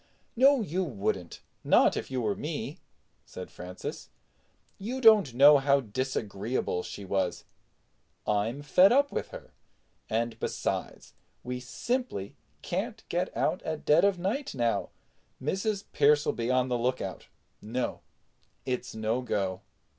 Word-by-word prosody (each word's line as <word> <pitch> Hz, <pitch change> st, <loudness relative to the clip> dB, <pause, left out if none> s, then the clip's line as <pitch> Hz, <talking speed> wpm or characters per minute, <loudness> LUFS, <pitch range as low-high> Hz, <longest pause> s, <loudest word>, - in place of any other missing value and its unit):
"No, 270 Hz, +2 st, +5 dB
you 185 Hz, -1 st, -1 dB
wouldn't; 100 Hz, -, -3 dB, 0.2 s
not -, -, +5 dB
if -, -, -4 dB
you 130 Hz, -1 st, -2 dB
were 105 Hz, -2 st, +1 dB
me," -, -, -5 dB, 0.4 s
said 90 Hz, -, -9 dB
Francis. 90 Hz, +1 st, -7 dB, 0.7 s
"You 235 Hz, +7 st, -4 dB
don't 215 Hz, -, +6 dB
know 145 Hz, +2 st, +8 dB
how 140 Hz, 0 st, +3 dB
disagreeable 110 Hz, -5 st, -2 dB
she 100 Hz, -, -8 dB
was. 95 Hz, -2 st, -1 dB, 0.8 s
I'm 110 Hz, +7 st, 0 dB
fed 180 Hz, +7 st, +6 dB
up 280 Hz, +3 st, +4 dB
with -, -, -3 dB
her. -, -, -11 dB, 0.6 s
And 115 Hz, 0 st, -1 dB
besides, -, -, -3 dB, 0.3 s
we 125 Hz, 0 st, -4 dB
simply 180 Hz, -, -3 dB, 0.3 s
can't -, -, -3 dB
get -, -, -2 dB
out -, -, +1 dB
at 160 Hz, -1 st, -5 dB
dead 150 Hz, +3 st, +5 dB
of 200 Hz, -2 st, +3 dB
night 205 Hz, -, -2 dB
now. 120 Hz, -2 st, 0 dB, 0.5 s
Mrs. 195 Hz, +7 st, -1 dB
Pearce'll 145 Hz, +1 st, +4 dB
be 115 Hz, 0 st, -2 dB
on 130 Hz, 0 st, +2 dB
the 125 Hz, -1 st, -1 dB
lookout. 120 Hz, -6 st, -2 dB, 0.3 s
No—it's 125 Hz, +2 st, -6 dB
no 110 Hz, +3 st, -1 dB
go." 95 Hz, -6 st, -2 dB
130 Hz, 130 wpm, -29 LUFS, 110-185 Hz, 0.8 s, know